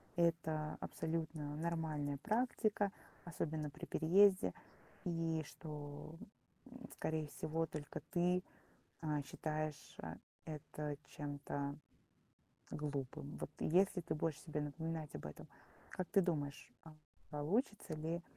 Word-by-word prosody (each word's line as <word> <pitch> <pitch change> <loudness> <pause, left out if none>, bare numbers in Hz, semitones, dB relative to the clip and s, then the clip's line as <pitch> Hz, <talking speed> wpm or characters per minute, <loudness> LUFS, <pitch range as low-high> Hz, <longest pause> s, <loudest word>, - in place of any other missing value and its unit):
это 160 -2 +2
абсолютно 155 -2 -1
нормальная 155 -3 0
практика, 215 - +2 0.3
особенно 155 -3 -1
при 165 +4 -7
переезде. 185 +5 +6 0.5
И 165 -3 +1
что, 150 0 -6 0.6
м, 255 0 -9
скорее 155 -1 0
всего, 160 +2 0
только 150 -2 -4
ты, 180 0 +4 0.6
э, 150 -2 +2
считаешь, 155 +1 -2
э, - - -4 0.3
это 150 -1 -3
чем-то 145 -1 -2 1.0
глупым. 145 -1 -2
Вот - - -3
если 185 +2 +5
ты 155 - -1
будешь 155 -1 0
себе 150 -2 -1
напоминать 160 +1 -2
об - - -4
этом, 75 - -8 0.4
как 185 - -1
ты 200 - +6
думаешь, 145 -6 0
а, 160 -1 -11 0.3
получится 170 - +1
ли 165 +3 -1
155 Hz, 110 wpm, -40 LUFS, 150-170 Hz, 1.0 s, переезде